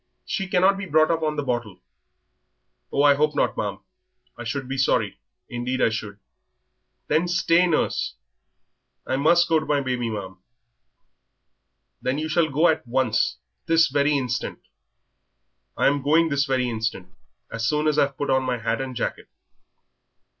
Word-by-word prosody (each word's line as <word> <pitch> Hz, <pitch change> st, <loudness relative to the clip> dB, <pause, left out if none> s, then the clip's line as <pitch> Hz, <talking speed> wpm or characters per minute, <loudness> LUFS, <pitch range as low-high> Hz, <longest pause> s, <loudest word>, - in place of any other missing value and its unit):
She 195 Hz, -, -3 dB
cannot 190 Hz, +1 st, +3 dB
be 195 Hz, -, -5 dB
brought 155 Hz, 0 st, +3 dB
up 165 Hz, -1 st, 0 dB
on 155 Hz, -1 st, -1 dB
the 145 Hz, -, -2 dB
bottle." 120 Hz, -6 st, -3 dB, 1.1 s
"Oh, 140 Hz, -, +2 dB
I 145 Hz, -1 st, +7 dB
hope 150 Hz, +1 st, +1 dB
not, -, -, +1 dB
ma'am. -, -, -3 dB, 0.5 s
I 120 Hz, -, -8 dB
should 130 Hz, +3 st, -4 dB
be 135 Hz, -, -3 dB
sorry, 135 Hz, -, +1 dB, 0.3 s
indeed 125 Hz, +2 st, -3 dB
I -, -, +4 dB
should." 110 Hz, -3 st, -5 dB, 0.9 s
"Then 160 Hz, +4 st, +2 dB
stay, 175 Hz, 0 st, +3 dB
nurse." 160 Hz, -3 st, 0 dB, 0.9 s
"I 130 Hz, -, -1 dB
must 170 Hz, +5 st, +4 dB
go 160 Hz, -1 st, +3 dB
to 155 Hz, -, -7 dB
my 145 Hz, -1 st, +2 dB
baby, 125 Hz, -3 st, -2 dB
ma'am." 95 Hz, -4 st, -6 dB, 1.6 s
"Then 130 Hz, +2 st, -1 dB
you 155 Hz, +1 st, -3 dB
shall 155 Hz, 0 st, +2 dB
go 155 Hz, +5 st, +3 dB
at 155 Hz, -5 st, 0 dB
once 125 Hz, -2 st, +1 dB, 0.3 s
this 165 Hz, -1 st, +4 dB
very 145 Hz, +1 st, +2 dB
instant." 125 Hz, -3 st, -3 dB, 1.2 s
"I'm 145 Hz, 0 st, +2 dB
going 160 Hz, +4 st, +3 dB
this 140 Hz, -1 st, +1 dB
very 130 Hz, -3 st, 0 dB
instant, 110 Hz, -5 st, -4 dB, 0.4 s
as 115 Hz, 0 st, -2 dB
soon 150 Hz, +3 st, +1 dB
as 150 Hz, -, +2 dB
I've 140 Hz, -1 st, +1 dB
put 145 Hz, -, -1 dB
on 130 Hz, -, +3 dB
my 130 Hz, -1 st, -1 dB
hat 115 Hz, +2 st, -2 dB
and 130 Hz, -1 st, -5 dB
jacket." 120 Hz, -, -3 dB
140 Hz, 160 wpm, -24 LUFS, 125-155 Hz, 1.6 s, I